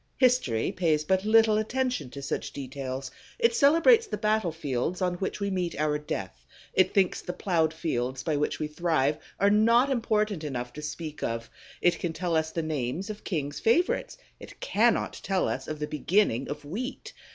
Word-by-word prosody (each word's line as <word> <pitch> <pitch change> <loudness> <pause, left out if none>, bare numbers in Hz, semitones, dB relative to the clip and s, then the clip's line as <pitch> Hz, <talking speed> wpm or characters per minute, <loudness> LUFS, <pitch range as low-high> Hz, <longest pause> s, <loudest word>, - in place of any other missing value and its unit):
History 250 - +2
pays 160 -4 +1
but 190 +5 +1
little 220 0 +5
attention 250 - -1
to 140 +2 -8
such 140 - -3
details: 135 -1 -5 0.3
it 465 -1 +3
celebrates 435 - +5
the - - -3
battlefields 175 - -1
on 180 -2 +1
which 190 - -3
we 200 -1 -1
meet 180 -4 -2
our 150 -1 +1
death, - - -5 0.3
it 185 - +4
thinks 190 -3 +2
the 180 - -5
plowed 165 -5 +1
fields 130 -6 -2
by 155 - 0
which 145 +1 0
we - - -2
thrive 150 -2 0 0.2
are 200 +1 +4
not 230 +5 +4
important 215 -7 0
enough 125 -4 -4
to 150 - -7
speak 150 0 -6
of; 115 0 -3 0.3
it 175 - +3
can 170 -2 -2
tell 175 -1 -1
us 160 0 +1
the 165 0 -3
names 155 - -2
of 210 - -10
kings' 145 -6 -3
favorites, 355 - +1 0.2
it - - -12
cannot - - +1
tell 190 -2 0
us - - -3
of 155 - -4
the 150 - -2
beginning 150 - +1
of 145 - -6
wheat! 230 - -5
170 Hz, 180 wpm, -27 LUFS, 150-215 Hz, 0.3 s, little